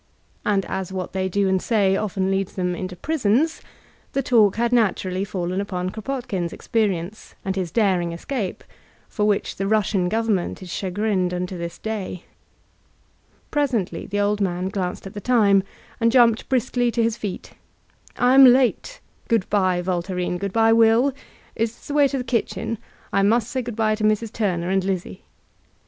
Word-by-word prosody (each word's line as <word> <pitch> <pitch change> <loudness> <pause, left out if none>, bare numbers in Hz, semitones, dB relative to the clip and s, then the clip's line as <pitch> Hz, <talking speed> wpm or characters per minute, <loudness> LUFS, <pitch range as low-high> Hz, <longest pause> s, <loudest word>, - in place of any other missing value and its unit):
And 195 -2 +1
as 190 -1 -4
what 185 -2 -5
they 190 0 -1
do 200 +1 +1
and 190 -1 +1
say 200 -4 +2
often 195 -2 -1
leads 195 -1 -1
them 180 -1 -1
into 185 0 -5
prisons, 290 - 0 0.5
the 275 - 0
talk 220 -6 +4
had 235 +1 0
naturally 195 -5 +1
faOcn 185 -1 -2
upon 185 -2 -3
Kropotkin's 220 -7 -3
experience 205 -3 -2
and 190 0 -1
his 185 -3 -2
daring 185 -4 +1
escape^ 190 +4 -4 0.5
for 210 - -1
which 205 -1 0
the 195 - -1
Russian 200 -3 +1
government 220 -4 -1
is 180 - -7
chagrined 190 -1 -1
unto 180 +1 -3
this 170 -1 -6
day. 200 -5 -5 1.3
Presently 245 - -1
the 205 +1 -2
old 205 0 +1
man 180 -1 -1
glanced 185 -2 -3
at 195 - -8
the 205 - -6
time, 205 -4 +4 0.4
and 230 0 +3
jumped 235 -2 +4
briskly 245 -1 +1
to 235 0 0
his 225 -1 +1
feet: 205 -5 -6 0.7
''I 250 +1 +4
am 270 0 +9
late. 260 - +3 0.3
Good 230 -5 +1
by, 185 -3 +2
Voltairine; 180 0 -2
good 200 0 -3
by, 225 +2 +4
WilL 230 +4 +4 0.4
Is 225 +1 -1
this - - -17
the - - -2
way 290 -1 +5
to 275 - -3
the 250 - -2
kitchen? 230 -2 -2 0.3
I 195 - +3
must 220 +3 +2
say 260 - -1
good*by 225 -2 0
to 215 0 -3
Mrs. 215 +1 +1
Turner 180 -5 -1
and 190 -1 +2
Lizzie." 190 -2 -3
205 Hz, 170 wpm, -23 LUFS, 185-230 Hz, 1.3 s, am